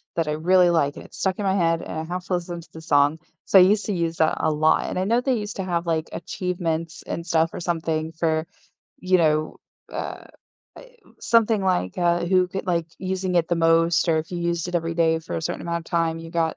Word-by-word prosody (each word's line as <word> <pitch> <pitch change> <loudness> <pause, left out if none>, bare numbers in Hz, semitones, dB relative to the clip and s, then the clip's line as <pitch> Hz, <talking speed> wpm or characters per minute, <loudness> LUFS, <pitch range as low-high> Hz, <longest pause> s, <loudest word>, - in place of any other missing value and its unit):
that 165 -2 0
I - - 0
really 180 +3 +4
like, 145 -4 +1
and - - -10
it's - - -14
stuck 190 +1 -1
in 200 - -2
my 190 0 +2
head, 165 -2 +1
and 160 - -5
I - - -3
have 180 +2 -4
to 185 - -3
listen 175 -1 -3
to - - -19
the 160 - -9
song. 145 0 +2 0.3
So, 195 - +6
I - - +9
used 205 +2 +3
to 205 - 0
use 170 -2 -2
that 160 - +2
a 160 - +1
lot, 155 +1 +2
and - - -4
I 185 - +1
know 230 +5 +2
they 255 0 0
used 210 0 -5
to 190 - -2
have, 175 -2 -2
like, 160 -1 -1
achievements 170 -3 -3
and 170 - -5
stuff 165 -1 +1
or - - -5
something 160 -2 -2
for, 160 0 0 0.5
you 185 0 +2
know, 155 -2 +1 0.4
uh, - - -11
uh, - - -5 0.9
something, 225 -3 +3
like, 180 - 0
uh, 175 -1 +2
who 185 0 +3
could 190 +1 -5
like, 170 -2 0
using 185 -1 -2
it 170 -1 +3
the 175 - +2
most 165 +1 +3
or 160 - +3
if 155 +1 -5
you 175 - -3
used 170 -1 -1
it 180 - -6
every 165 -1 0
day 160 -1 +2
for 160 - -5
a 160 - -4
certain - - -3
amount 170 0 -2
of 165 - -11
time, 165 -1 0
you 165 0 -9
got 165 -1 0
170 Hz, 250 wpm, -23 LUFS, 160-180 Hz, 0.9 s, I